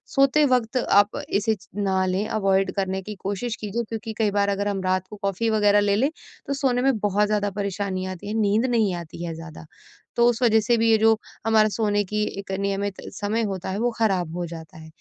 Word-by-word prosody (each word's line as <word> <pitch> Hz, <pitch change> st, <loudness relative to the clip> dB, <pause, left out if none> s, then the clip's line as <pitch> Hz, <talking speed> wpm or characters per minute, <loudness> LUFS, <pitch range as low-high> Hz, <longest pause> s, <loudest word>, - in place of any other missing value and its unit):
सोते 275 Hz, +2 st, +4 dB
वक़्त 245 Hz, 0 st, +1 dB
आप 205 Hz, -4 st, +3 dB
इसे 220 Hz, +2 st, +1 dB
च 190 Hz, -2 st, -20 dB
ना 190 Hz, -2 st, +1 dB
लें, 185 Hz, +3 st, 0 dB
अवॉइड 195 Hz, -3 st, +1 dB
करने 190 Hz, -1 st, -1 dB
की 210 Hz, +2 st, -7 dB
कोशिश 205 Hz, +4 st, -2 dB
कीजिए, 215 Hz, +3 st, -2 dB
क्योंकि 225 Hz, 0 st, -5 dB
कई 215 Hz, -2 st, +2 dB
बार 200 Hz, 0 st, +1 dB
अगर 200 Hz, 0 st, -1 dB
हम 195 Hz, -1 st, -2 dB
रात 185 Hz, 0 st, 0 dB
को -, -, -8 dB
कॉफी 200 Hz, +4 st, 0 dB
वगैरह 205 Hz, -1 st, +4 dB
ले 205 Hz, -1 st, +2 dB
लें, 265 Hz, +8 st, +2 dB, 0.4 s
तो 280 Hz, -, -1 dB
सोने 265 Hz, -3 st, +1 dB
में 265 Hz, -2 st, +2 dB
बहुत 205 Hz, 0 st, +2 dB
ज़्यादा 205 Hz, -1 st, 0 dB
परेशानी 195 Hz, -1 st, -2 dB
आती 185 Hz, 0 st, -7 dB
है, 210 Hz, -, -3 dB
नींद 210 Hz, +3 st, +2 dB
नहीं 225 Hz, -6 st, +2 dB
आती 170 Hz, 0 st, -7 dB
है 165 Hz, -, -4 dB
ज़्यादा। 165 Hz, -1 st, -10 dB, 0.5 s
तो 235 Hz, -, +4 dB
उस 235 Hz, 0 st, -2 dB
वजह 225 Hz, -2 st, +5 dB
से 235 Hz, +3 st, +2 dB
भी 225 Hz, 0 st, +2 dB
ये 220 Hz, -, +6 dB
जो 220 Hz, 0 st, +4 dB, 0.3 s
हमारा 215 Hz, -1 st, +4 dB
सोने 205 Hz, -1 st, +1 dB
की 210 Hz, +2 st, -1 dB, 0.2 s
एक 195 Hz, -1 st, -7 dB
नियमित 200 Hz, 0 st, -2 dB
समय 205 Hz, +3 st, -1 dB
होता 190 Hz, -3 st, -3 dB
है, 190 Hz, -, -3 dB
वो 240 Hz, +1 st, +1 dB
खराब 185 Hz, -7 st, +1 dB
हो 175 Hz, 0 st, -2 dB
जाता 165 Hz, +1 st, -10 dB
है। 160 Hz, 0 st, -11 dB
205 Hz, 225 wpm, -24 LUFS, 190-225 Hz, 0.5 s, ये